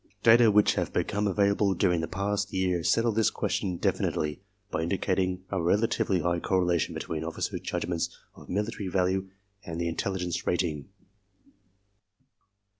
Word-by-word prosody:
Data 115 0 +7
which 105 0 +4
have - - -2
become 105 +1 0
available 100 0 +2
during 90 -2 +2
the 80 - -3
past 100 +3 -2
yeaj' 90 -3 0
settle 115 0 +3
this 110 0 +2
question 90 -3 -2
definitely 75 0 -1 0.3
by - - -1
indicating 95 +1 0
a 95 - -1
rela 90 +5 +2
tively 95 -6 0
high 85 0 +1
correlation 90 -2 +1
between 80 -1 -4
officers* 80 0 -3
judgments 85 -2 -2 0.2
of - - -15
military 105 +1 -2
value 95 +1 0 0.3
and 85 -4 -6
the 85 - 0
intelligence 90 +1 -2
rating. 85 -3 -1
95 Hz, 140 wpm, -28 LUFS, 85-100 Hz, 0.3 s, Data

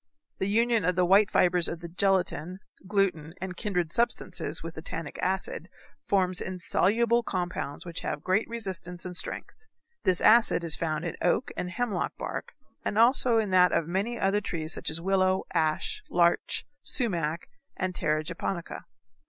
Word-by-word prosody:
The 190 - 0
union 230 0 +3
of 180 +2 +1
the 180 0 +3
white 195 +3 +5
fibres 180 -2 +3
of 170 0 -5
gelatin, 185 -2 +1 0.3
gluten, 185 -6 0
and 185 0 -5
kindred 180 -5 -2
substances 235 +1 -1
with - - -6
the - - -8
tannic - - -6
acid, - - -2 0.3
forms 185 -2 +1
insoluble 215 +6 +2
compounds 180 -8 -4
which 170 -1 -6
have 150 - -4
great 190 +5 +1
resistance 185 -6 -5
and 180 -1 -6
strength. - - -2 0.5
This 185 -2 +2
acid 220 -5 +5
is 165 -2 0
found 160 0 -2
in 170 - -4
oak 200 +8 +1
and 180 - -3
hemlock 210 -2 -2
bark, - - -5 0.3
and 210 - -2
also 240 0 +5
in 215 -3 0
that 180 -1 +5
of 165 - +1
many 200 +7 -1
other 195 +2 +2
trees 160 -4 -3
such - - -3
as 160 - -4
willow, 185 +1 +2
ash, 165 - 0
larch, 170 -1 +2 0.2
sumac, 170 - +1 0.3
and 185 -1 -1
terra 155 -3 0
japonica. 170 +2 -4
185 Hz, 160 wpm, -28 LUFS, 170-210 Hz, 0.5 s, white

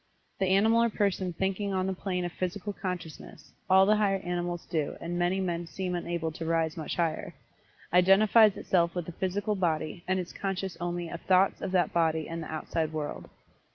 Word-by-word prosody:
The 190 - +1
animal 220 +5 +4
or 235 - +3
person 195 -3 0
thinking 195 +3 -2
on 185 -1 0
the 190 - -1
plane 180 -1 -2
of 175 - -3
Physical 185 +3 -3
Consciousness 180 -5 -7 0.2
(all 190 +1 +7
the 210 +1 +4
higher 200 -2 +2
animals 175 -1 -3
do, 155 -3 -2
and 170 +1 -4
many 175 +2 +1
men 175 -2 -2
seem 180 +3 -4
unable 170 -2 -2
to 160 - -7
rise 165 -1 0
much 160 -2 -4
higher) 165 -2 -2 0.6
identifies 200 +4 +6
itself 170 -2 +1
with 175 -2 -2
the 175 - -6
physical 195 +4 -1
body, 170 -3 -1
and 185 0 +1
is 180 - -6
conscious 195 -2 -3
only 175 0 -2
of 170 - -7
thoughts 190 +1 +3
of 195 - -3
that 180 -2 +2
body 160 -2 +1
and 165 0 -5
the 160 - -7
outside 160 0 -2
world. 155 -2 -5
180 Hz, 190 wpm, -29 LUFS, 170-195 Hz, 0.6 s, all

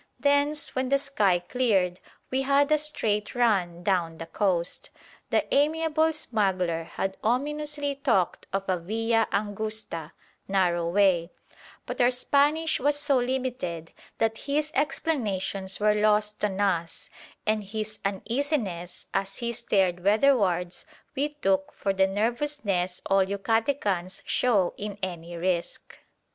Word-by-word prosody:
Thence, 285 +1 +1
when 260 0 -1
the 275 - +4
sky 215 -10 +2
cleared, 185 -2 0 0.3
we 260 +1 +1
had 280 +2 +3
a 305 - +5
straight 215 -9 -1
run 190 -8 +1
down 175 -4 0
the 165 - -6
coast. 175 -1 -1 0.4
The - - +2
amiable 315 +2 +2
smuggler 190 - 0
had 190 +3 -4
ominously 290 +4 0
talked 235 -10 0
of 195 0 -1
a 185 -2 +1
via 225 +5 +1
angusta 205 -5 -3 0.3
(narrow 175 -3 +1
way); 180 -3 +3 0.6
but - - -3
our 245 - +6
Spanish 290 +5 +2
was 290 +2 +1
so 290 -3 +2
limited 245 -10 -3 0.3
that 225 0 0
his 300 +2 +1
explanations 205 - -1
were 210 0 +4
lost 210 0 +2
on 200 -2 0
us, 175 -5 -1 0.4
and 215 -1 +1
his 215 +1 -5
uneasiness, 200 - -2
as 195 0 -1
he 235 0 -2
stared 185 -6 +1
weatherwards, 200 -6 +2 0.3
we 290 +2 0
took 195 -10 0
for 195 - -1
the 190 0 +3
nervousness 205 -4 -1
all 195 0 +4
Yucatecans 200 -2 -1
show 205 -8 +2
in 205 -1 -5
any 175 -2 -5
risk. 175 0 -2
210 Hz, 130 wpm, -27 LUFS, 185-270 Hz, 0.6 s, our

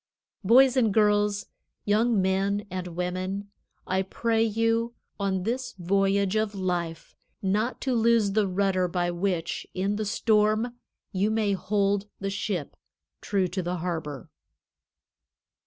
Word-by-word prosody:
Boys 255 +5 +6
and 230 -5 +3
girls, 205 -1 +2 0.4
young 215 +1 +3
men 195 +2 +1
and 185 -1 -4
women, 185 +3 -3 0.3
I 190 +1 +1
pray 225 +4 0
you, 230 +1 +1 0.2
on 190 -2 0
this 250 +5 -2
voyage 195 +2 +1
of 215 -1 0
life, 175 -4 -3 0.3
not 215 +6 0
to 265 - 0
lose 230 -3 +3
the 210 0 +2
rudder 185 -1 +1
by 175 0 -1
which, 175 -1 -2
in 195 +2 0
the 215 - -2
storm, 215 +2 +2 0.4
you 200 +1 +1
may 220 -2 +1
hold 200 +1 0
the 195 0 -2
ship 195 -6 -3 0.5
true 195 -3 0
to 185 +1 -2
the 175 +1 -2
harbor. 160 -6 -4
200 Hz, 130 wpm, -27 LUFS, 185-215 Hz, 0.5 s, Boys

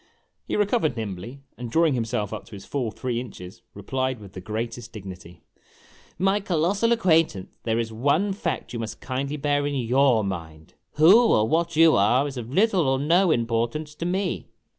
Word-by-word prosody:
He - - -2
recovered 205 - +1
nimbly, 110 +5 -6 0.2
and, 120 -1 -5
drawing 160 +4 +3
himself 110 -4 -2
up 110 - -6
to 115 - -16
his 100 -1 -9
full 130 -5 -2
three 120 +3 -3
inches, 90 -7 -9
replied 130 +5 -2
with 100 -2 -13
the 95 - -8
greatest 115 +3 -5
dignity: 90 -5 -10 0.4
" - - -28
My 200 +2 +3
colossal 195 +5 +1
acquaintance, 165 - +2
there 115 -1 +1
is 115 -1 -2
one 145 - +1
fact 175 -9 -4
you 120 - -4
must 110 -1 -6
kindly 140 +3 -3
bear 145 0 0
in 145 - -2
your 125 -2 +3
mind: 80 -5 -6 0.2
Who. 195 +11 +6
or 110 - +3
what 165 +3 0
you 165 0 +6
are 120 +8 +3
is 140 - -7
of 120 -1 -6
little 190 -2 +3
or 135 0 +2
no 170 +7 +3
impor 115 -5 +1
tance 150 +1 -6
to 165 - -6
me. 185 +1 -2
130 Hz, 185 wpm, -24 LUFS, 110-160 Hz, 0.4 s, Who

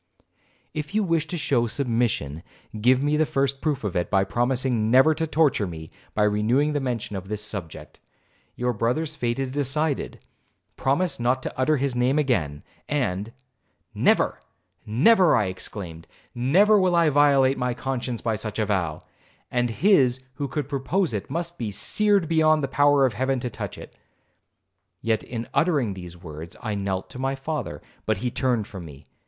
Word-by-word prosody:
'If 155 +6 -5
you 215 - +3
wish 165 -4 0
to 175 - -4
show 120 -6 +1
submission, 115 - -1 0.4
give 130 +4 +4
me 150 +1 +2
the 155 - +3
first 135 0 0
proof 150 -6 -1
of 100 -4 -3
it, 90 -1 0
by 95 -1 +3
promising 120 +1 0
never 130 +6 +6
to 160 +1 -2
torture 150 -10 +2
me 80 -2 -8 0.2
by 105 - +3
renewing 115 +8 +2
the 145 - +1
mention 120 -6 -3
of 95 0 -6
this 105 0 -4
subject. 95 -7 -8 0.6
Your 125 0 -1
brother's 125 +8 -1
fate 120 -4 -1
is 135 -1 -2
decided,—promise 145 +2 -2
not 125 +2 +1
to - - -4
utter 150 +4 +2
his 140 -1 -1
name 125 +3 +2
again, 80 - 0 0.3
and—' 110 -7 -1 0.6
'Never,—never,' 165 - +2
I 110 -4 +2
exclaimed, 90 -3 -6 0.3
'never 190 - +4
will 185 -2 +2
I 170 -2 +4
violate 140 -2 +4
my 125 -1 -1
conscience 125 -2 -3
by 115 -2 0
such 110 0 -5
a 110 - +1
vow; 90 -7 -1 0.5
and 120 -1 +1
his 130 - +3
who 140 +2 -3
could 140 0 -3
propose 145 +4 -1
it 105 - -4
must 170 +4 -4
be 115 -3 -2
seared 200 - +1
beyond 155 -2 +3
the - - +1
power 145 -1 +4
of 125 - 0
Heaven 130 +4 0
to 125 - -3
touch - - -6
it.' - - -11 1.0
Yet, 110 -1 0
in 115 -1 -6
uttering 145 - +2
these 90 -2 -9
words, 80 -1 -9
I 110 -3 -3
knelt 95 -2 -2
to 125 - -8
my 135 +1 -1
father, 135 -1 -4 0.2
but 110 -2 +2
he 125 +5 -2
turned 125 -5 0
from 95 -3 -9
me. 70 -3 -12
125 Hz, 170 wpm, -24 LUFS, 105-145 Hz, 1.0 s, never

